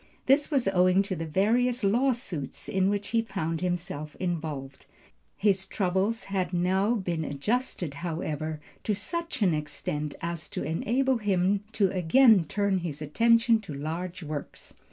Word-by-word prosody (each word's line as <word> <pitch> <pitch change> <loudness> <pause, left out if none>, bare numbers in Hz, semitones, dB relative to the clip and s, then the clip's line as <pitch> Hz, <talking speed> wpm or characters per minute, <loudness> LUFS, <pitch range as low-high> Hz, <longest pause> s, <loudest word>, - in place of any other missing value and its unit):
This 280 +2 +4
was 275 -8 +1
owing 185 +1 +4
to 195 -1 -3
the 165 -1 -4
various 235 +8 +2
lawsuits 225 - 0
in 190 0 +2
which 205 0 -2
he 230 0 +2
found 165 -7 -3
himself 170 -4 -3
involved. 155 -6 -4 0.5
His 195 -2 +2
troubles 190 +4 0
had 185 -3 -2
now 190 +6 +2
been 175 -6 -2
adjusted, 175 - -2
however, 155 -2 -3 0.2
to 210 - 0
such 335 - -3
an 180 -4 +4
extent 150 -1 -3
as 170 -2 -4
to - - -4
enable 250 +10 +1
him 195 -1 +1
to 195 -4 +2
again 200 +2 +5
turn 200 +2 0
his 165 -4 -5
attention 230 +8 +4
to 180 -9 -8
large 170 +5 -4
works. 150 -1 -7
185 Hz, 145 wpm, -28 LUFS, 160-220 Hz, 0.5 s, again